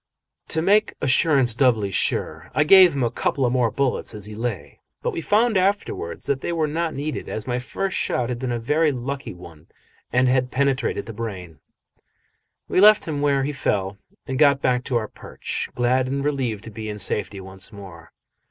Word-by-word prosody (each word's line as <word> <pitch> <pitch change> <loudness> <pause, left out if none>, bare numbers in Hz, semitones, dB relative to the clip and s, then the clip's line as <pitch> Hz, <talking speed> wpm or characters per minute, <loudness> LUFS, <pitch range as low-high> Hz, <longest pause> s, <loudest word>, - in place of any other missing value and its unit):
To 160 - -1
make 210 +4 +3
assurance 135 -3 +3
doubly 115 -6 +2
sure, - - -1
I 155 - +4
gave 185 0 +7
him 135 - 0
a 115 - 0
couple 130 +2 0
more 125 -2 +2
bullets 130 -4 -1
as 105 -2 -8
he 105 - -8
lay, 115 -2 -5 0.2
but - - 0
we - - -4
found 215 +5 +2
afterwards 190 - -1
that 140 -1 -1
they - - -3
were 165 -2 +1
not 160 +2 -2
needed, 145 +2 -4
as 110 - -5
my 125 0 -1
first 190 +9 -3
shot 120 -1 0
had 120 -1 -3
been 130 -1 -3
a 120 - -1
very 150 +7 +1
lucky 135 -4 -5
one 85 -4 -14 0.4
and 125 +1 +3
had 125 0 +2
penetrated 135 -5 0
the 115 - -8
brain. 95 -8 -7 1.1
We 185 - +2
left 210 -2 +6
him 145 -3 -2
where 140 -2 +2
he 145 - -1
fell 100 -7 -2 0.3
and 130 0 -3
got 140 -2 +5
back 125 -2 +1
to 130 - -2
our 110 -2 -2
perch, - - -6
glad 125 +1 +2
and 140 +1 -2
relieved 125 -8 -1
to 115 - -9
be 110 0 -6
in 105 - -5
safety 100 0 -2
once 95 0 -6
more. 95 -5 -12
130 Hz, 195 wpm, -23 LUFS, 110-145 Hz, 1.1 s, gave